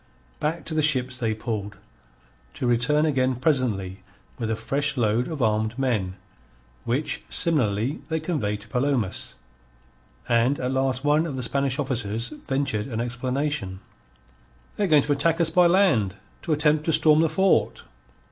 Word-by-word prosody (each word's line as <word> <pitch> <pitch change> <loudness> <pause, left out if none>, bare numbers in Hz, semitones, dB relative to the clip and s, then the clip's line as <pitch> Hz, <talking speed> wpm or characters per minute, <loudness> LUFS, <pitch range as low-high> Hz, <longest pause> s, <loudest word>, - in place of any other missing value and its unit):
Back 160 +3 -2
to 160 - -3
the 155 - +1
ships 130 -4 +2
they 115 -3 -1
pulled, 105 -3 -5 0.8
to - - -3
return 125 +6 +2
again 130 -4 +1
presently 115 - -1 0.4
with 115 - -2
a 110 - 0
fresh 140 +5 -1
load 115 +1 +1
of 155 -6 -3
armed 110 +1 0
men, 110 -9 -1 0.7
which 130 +6 -1
similarly 130 -3 0
they 160 0 0
conveyed 115 - -2
to 110 - -11
Palomas. 125 -4 -1 0.9
And 120 +4 +2
at 125 0 -2
last 130 0 0
one 150 +3 +2
of 145 - -5
the 130 - -3
Spanish 140 +2 0
officers 120 -5 -1
ventured 135 -7 -3
an 115 -4 -4
explanation: 125 -4 -2 1.0
"They 205 - 0
are - - -1
going 150 -4 +5
to 150 - -2
attack 165 +4 +2
us 165 -1 +3
by 180 +1 +5
land 155 - +3 0.3
to 165 - -4
attempt 150 0 +2
to 165 - +1
storm 155 0 +6
the 165 0 +3
fort." 190 +2 +1
130 Hz, 155 wpm, -24 LUFS, 115-150 Hz, 1.0 s, storm